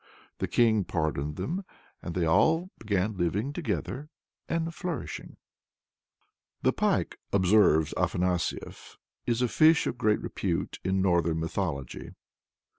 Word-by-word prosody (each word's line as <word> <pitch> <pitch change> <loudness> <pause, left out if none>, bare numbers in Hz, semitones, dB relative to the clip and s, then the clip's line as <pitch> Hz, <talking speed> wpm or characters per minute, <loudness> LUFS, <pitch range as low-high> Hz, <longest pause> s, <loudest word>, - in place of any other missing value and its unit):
The - - -1
King 110 -4 +3
pardoned 75 -4 -2
them, 160 - -3 0.4
and 85 - -6
they 90 -2 +1
all 165 - +3
began 105 -1 -1
living 100 - 0
together 150 -3 -3 0.4
and 165 0 -1
flourishing. 170 -5 -5 1.3
"The - - +3
Pike," - - 0
observes 95 -5 +4
Afanasief, 90 -1 -2 0.3
"is 120 +1 +1
a - - +3
fish 155 +6 +5
of 120 - -3
great 105 -3 +3
repute 90 -4 -3
in 95 +1 +1
northern 85 -3 +2
mythology." 80 -5 -3
100 Hz, 115 wpm, -28 LUFS, 85-125 Hz, 1.3 s, fish